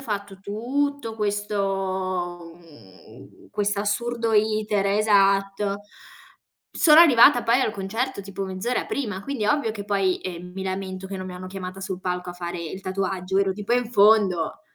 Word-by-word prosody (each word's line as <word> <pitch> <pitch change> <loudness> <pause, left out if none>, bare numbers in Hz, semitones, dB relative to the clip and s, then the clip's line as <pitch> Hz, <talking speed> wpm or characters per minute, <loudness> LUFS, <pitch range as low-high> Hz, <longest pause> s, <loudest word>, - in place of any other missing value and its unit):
fatto 200 -6 -5
tutto 240 +4 -2
questo 190 -4 -2
mhmm, 130 - -17
questo 205 -1 -1
assurdo 230 +2 -1
iter 215 -1 +1
esatto. 200 -1 +2 0.9
Sono 315 -3 +6
arrivata 250 -5 +7
poi 235 +3 +3
al 220 - 0
concerto 220 +5 -3
tipo 195 0 -5
mezz'ora 190 +6 -2
prima, 210 -8 -3
quindi 270 -2 -3
ovvio 285 -2 +1
che 205 -2 -7
poi, 195 -2 0
ehm, 180 -1 -7
mi 190 - -5
lamento 190 0 -4
che 195 0 -6
non 185 0 -6
mi 185 - -7
hanno 180 +1 -8
chiamata 185 0 -7
sul 190 -1 -5
palco 180 -1 -3
a - - -7
fare 175 0 -5
il 170 +3 -6
tatuaggio, 190 0 -2
ero 195 -1 +2
tipo 210 +3 -4
in 245 -1 +1
fondo. 200 -6 +3
200 Hz, 155 wpm, -24 LUFS, 185-220 Hz, 0.9 s, arrivata